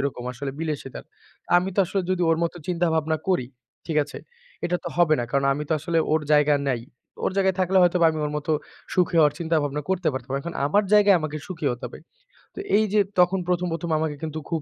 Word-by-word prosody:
ওরকম 135 -3 -3
আসলে 135 +2 -5
বিলাসিতার। 150 -5 -5 0.5
আমি 180 +2 +2
তো - - -5
আসলে 195 +3 -1
যদি 185 -1 0
ওর 165 - +3
মত 170 - -1
চিন্তা 175 -1 +1
ভাবনা 160 0 +1
করি, 175 -10 +1 0.4
ঠিক 160 - -2
আছে? 145 - -9 0.5
এটা 180 - +1
তো - - -2
হবে 170 -3 +4
না। - - -1
কারণ 140 +1 +1
আমি 150 - -4
তো - - +1
আসলে 165 +2 0
ওর 155 - +3
জায়গা 150 0 +5
নাই। 125 -3 0 0.4
ওর - - +1
জায়গায় 190 -1 +2
থাকলে 185 +1 +3
হয়তো 175 0 +3
আমি 155 - -4
ওর - - -4
মত 150 +1 -6 0.5
সুখী 180 -1 +2
হওয়ার 150 -2 +5
চিন্তা 165 -1 0
ভাবনা 145 +1 -3
করতে 185 -3 +1
পারতাম। 130 0 -6
এখন 170 +4 -6
আমার 205 +8 +2
জায়গায় 205 -2 +6
আমাকে 155 -1 -4
সুখী 165 -5 -5
হতে 125 +1 -5
হবে। - - -10 0.6
তো - - -7 0.2
এই 215 - +4
যে 215 - +4 0.2
তখন 180 +2 +4
১ম 180 0 0
১ম 170 +1 -4
আমাকে 155 -2 -2
কিন্তু 155 0 -4
খুব 165 -2 0
160 Hz, 220 wpm, -24 LUFS, 150-180 Hz, 0.6 s, জায়গায়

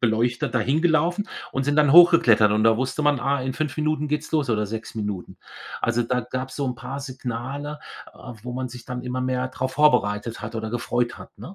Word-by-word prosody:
Beleuchter 120 +1 +1
da 125 - 0
hingelaufen 165 - +1 0.2
und 135 0 -1
sind 145 +1 0
dann 150 -2 +4
hochgeklettert. 145 -12 +7
Und 110 +1 +2
da 115 0 +5
wusste 130 +4 -2
man: 145 -4 +2
„Ah, 140 -1 0
in 130 0 -2
5 155 0 -3
Minuten 155 -1 -1
geht's 150 +1 -3
los 150 -4 +1
oder 105 -2 +1
6 110 +2 -6
Minuten.“ 105 -4 -5 0.5
Also, 120 0 +1
da 125 +2 0
gab's 130 +2 -5
so 140 - -1
'n 125 - -2
paar 135 +2 -6
Signale, 135 +3 -5 0.3
äh, 125 - -10
wo 125 +1 -6
man 130 0 -3
sich 120 0 -11
dann 125 -1 -5
immer 125 0 -3
mehr 130 0 -1
drauf 130 0 -4
vorbereitet 115 -7 +2
hat 110 +2 -6
oder 110 -1 -4
gefreut 120 0 -1
hat, - - -13
ne? 185 - -9
130 Hz, 215 wpm, -24 LUFS, 120-145 Hz, 0.5 s, hochgeklettert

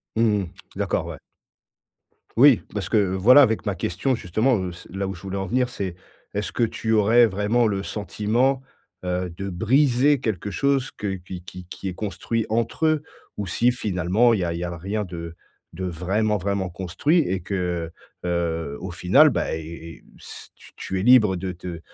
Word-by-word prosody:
Mmh 110 -2 +3
mh, - - -3 0.3
d'accord, - - -1
ouais. - - -7 1.2
Oui, 135 -3 +7
parce 105 -2 -3
que, 110 - +3
voilà 100 +7 +6
,avec 115 -5 +2
ma 100 -3 -1
question 95 +10 -1
justement, 115 +5 +1
heu, 95 -2 -3
c 85 - -13
là 95 +1 -3
où 95 - -4
je 85 - -13
voulais 95 0 -4
en 95 - -3
venir, 125 +4 +1
c'est 95 -7 -4 0.4
est-ce 105 +1 -2
que 120 - 0
tu 110 0 -2
aurais 110 +3 +5
vraiment 105 +3 +1
le 100 -2 -1
sentiment, 110 +6 0 0.4
heu, 90 0 -2
de 100 +2 -5
briser 130 +8 +3
quelque 105 -4 -3
chose 135 +6 +1
que 100 -2 -3
qui 90 -1 -9
qui 90 0 -10
qui 95 +2 -7
est 90 - -5
construit 110 +3 -3
entre 115 +7 0
eux? 155 -1 +3 0.4
Ou 100 - -3
si 120 +8 +2
finalement 105 0 +2
il 105 - 0
y - - 0
a 85 - -1
il 85 - -4
y - - -3
a 85 0 -4
rien 100 +4 -3
de 85 -2 -7 0.4
de 95 +3 -4
vraiment, 95 +5 0
vraiment 100 0 -1
construit 95 - 0
et 95 - 0
que, 90 -3 -3 0.3
heu, 85 -4 -1
au 95 - -6
final, 95 - +5
bah, 120 - -1
et - - -4
et 85 +1 -10 0.2
s - - -11
t - - -18
tu 95 0 -4
es - - -2
libre 110 -5 +6
de 95 +1 -3
te 85 -1 -7
100 Hz, 195 wpm, -23 LUFS, 90-115 Hz, 1.2 s, Oui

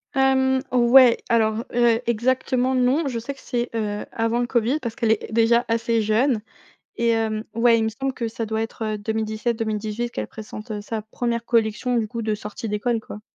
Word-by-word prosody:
Hem, 265 0 +3
ouais, 245 0 +6
alors 225 -1 +2
heu, 235 -1 +3
exactement, 255 +2 +1
non, 260 +5 +2
je 250 -3 -3
sais 235 +5 -5
que - - -19
c'est, 240 -2 -2
heu, 210 -2 -2
avant 230 +1 0
le - - +1
Covid 240 +2 +1
parce 235 -6 -5
qu'elle 230 -4 +1
est 220 - -6
déjà 235 +1 +3
assez 230 0 +1
jeune 225 +3 +2 0.6
et 235 0 +2
hem, 220 -1 0
ouais, 230 0 +4
il 225 - +1
me - - +1
semble 270 +4 -3
que 240 -2 -4
ça 225 0 -4
doit 220 0 -2
être, 225 0 -6
heu - - -4
2017-2018 220 +1 -2
qu'elle - - -4
présente, 215 +1 -9
heu, 210 - -4
sa 215 +2 -4
1re 235 +2 -3
collection 230 +1 +1
du 220 -2 0
coup 230 +1 -5
de 215 -1 0
sortie 210 +2 -6
d'école, 220 +3 0
quoi. 210 - -10
230 Hz, 200 wpm, -23 LUFS, 220-245 Hz, 0.6 s, ouais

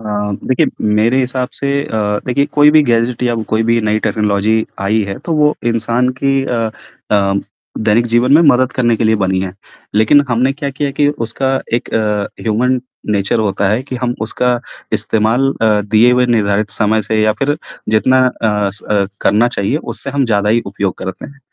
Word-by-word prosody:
अ, - - -13 0.4
देखिए 130 - +2 0.3
मेरे 115 +5 +2
हिसाब 125 0 -2
से 140 - -3 0.2
अ, 105 -2 -1
देखिए 140 +3 +1
कोई 150 0 +5
भी 155 0 +5
गैजेट 120 -1 0
या 120 -1 +1 0.2
कोई 110 +1 +2
भी 115 0 +3
नई 105 0 0
टेक्नोलॉज़ी 105 +1 0 0.2
आई 110 +2 +2
है, 95 - -5
तो 170 - -4
वो 150 -1 +3
इंसान 115 +2 +1
की 135 -1 +2
अ 120 -3 -2 0.5
अ, 100 -2 +2 0.4
दैनिक 110 +2 +2
जीवन 120 +3 +3
में 155 - +7
मदद 130 -4 +3
करने 120 -2 +1
के 115 - -1
लिए 110 0 +3
बनी 95 -2 0
है। 95 -1 -4 0.4
लेकिन 110 +7 +4
हमने 125 +3 +1
क्या 140 0 -4
किया 140 +1 -2
है 140 - -5
कि 145 +1 +2 0.2
उसका 130 +4 -1 0.2
एक 120 - -3
अ, 105 -2 0 0.2
ह्यूमन 125 +4 +1 0.3
नेचर 100 +2 +1
होता 100 -2 0
है 110 +5 0
कि 130 -1 -6
हम 120 0 -2
उसका 125 +2 0 0.4
इस्तेमाल 115 +5 +1
अ, 105 -2 +3
दिए 110 +4 +3
हुए 125 0 +3
निर्धारित 105 -3 +1
समय 110 0 +1
से 110 +1 -1
या 110 0 +3
फिर 145 +2 +1 0.3
जितना 110 +4 +3 0.2
अ, 105 -3 +1
स 105 - -8
अ, 100 -2 0
करना 115 +4 +3
चाहिए 110 +3 -1
उससे 140 - -3
हम 140 0 0
ज़्यादा 105 -3 0
ही 115 +2 +3
उपयोग 100 -1 -2
करते 95 0 -6
हैं। 140 - -15
115 Hz, 195 wpm, -15 LUFS, 105-130 Hz, 0.5 s, में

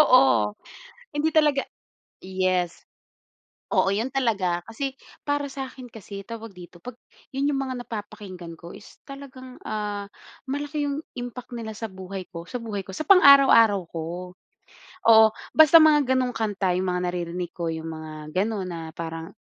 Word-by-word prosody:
Oo. 130 - +5 0.6
Hindi 300 +2 -1
talaga 295 -3 +3 0.6
yes. 185 -2 -1 0.9
Oo, 195 - +3
'yun 225 +7 -1
talaga. 200 -10 0
Kasi 265 +4 -4 0.3
para 290 -1 -1
sa 270 0 -5
akin 255 -1 -11
kasi 200 -2 -9
tawag 225 0 -9
dito, 175 -1 -13
'pag 250 +9 -9 0.4
'yun 275 +2 +1
'yung 285 - 0
mga 260 -2 -3
napapakinggan 200 -6 -8
ko 170 - -10
is 205 - -16
talagang, 260 -2 -10
ah, 205 -1 -3 0.4
malaki 290 +2 -3
'yung 285 +1 -2 0.2
impact 245 0 -7
nila 225 -2 -5
sa 220 +1 -6
buhay 190 0 -8
ko, 170 0 -8
sa 250 +6 -6
buhay 205 -4 -5
ko, 190 - -9
sa 310 +9 -5
pang-araw-araw 275 - +7
ko. 165 -1 -5 1.1
Oo, 220 -1 +9 0.3
basta 315 +1 +9
mga 295 -4 +5
gano'ng 255 -1 0
kanta 200 -4 0
'yung 185 - -1
mga 180 - -1
naririnig 175 0 -4
ko, 170 -2 -2
yung 160 0 -6
mga 155 -1 -8
ganun 210 -4 -3
na 165 -2 -6
parang, 165 0 -6
220 Hz, 155 wpm, -25 LUFS, 180-270 Hz, 1.1 s, Oo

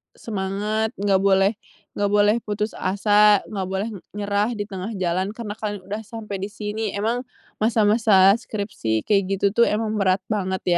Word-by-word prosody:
semangat, 210 +1 -2
enggak 195 -1 +2
boleh 195 +1 +3 0.5
enggak 205 0 +1
boleh 210 +1 +4
putus 210 +1 -2
asa, 205 +1 +4
enggak 195 -3 -4
boleh, 195 +3 -2
e 200 - -8 0.2
nyerah 205 +3 0
di 205 - -2
tengah 200 +1 -6
jalan. 185 +3 -1
Karena 225 -3 -6
kalian 205 -3 -4
udah 205 +3 -5
sampai 215 -3 -6
di 195 - -3
sini." 210 0 -4
Emang 235 +5 -1 0.3
masa-masa 215 -3 +4
skripsi 195 - -3
kayak 200 -2 +2
gitu 195 - -1
tuh 235 +2 +4
emang 215 0 -1
berat 185 -1 +2
banget, 190 -3 -1
205 Hz, 160 wpm, -23 LUFS, 195-215 Hz, 0.5 s, boleh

